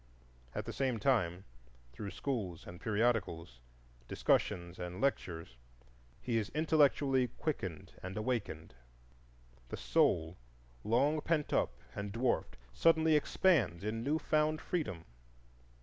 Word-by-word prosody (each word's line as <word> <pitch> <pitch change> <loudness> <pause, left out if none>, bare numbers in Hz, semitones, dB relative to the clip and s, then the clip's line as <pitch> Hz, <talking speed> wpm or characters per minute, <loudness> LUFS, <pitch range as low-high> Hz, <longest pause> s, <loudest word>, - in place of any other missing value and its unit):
At - - -3
the - - -5
same 130 -3 0
time, 95 -7 +1 0.5
through 100 +11 -5
schools 100 - -3
and 85 0 -10
periodicals, 105 - 0 0.5
discussions 85 +6 0
and 90 +1 -5
lectures, 85 - -2 0.6
he 115 - -1
is 105 - -3
intellectually 140 -4 +3
quickened 95 - -3
and 95 +2 -6
awakened. 110 - -2 1.0
The - - -4
soul, 80 +3 +2 0.5
long 140 +7 +2
pent 155 -2 0
up 65 - +1 0.2
and 100 0 -4
dwarfed, 120 +3 0 0.2
suddenly 160 -1 +4
expands 135 - +2
in 110 +2 -2
new 145 +5 +1
found 155 0 +1
freedom. 95 - -3
115 Hz, 115 wpm, -34 LUFS, 90-145 Hz, 1.0 s, suddenly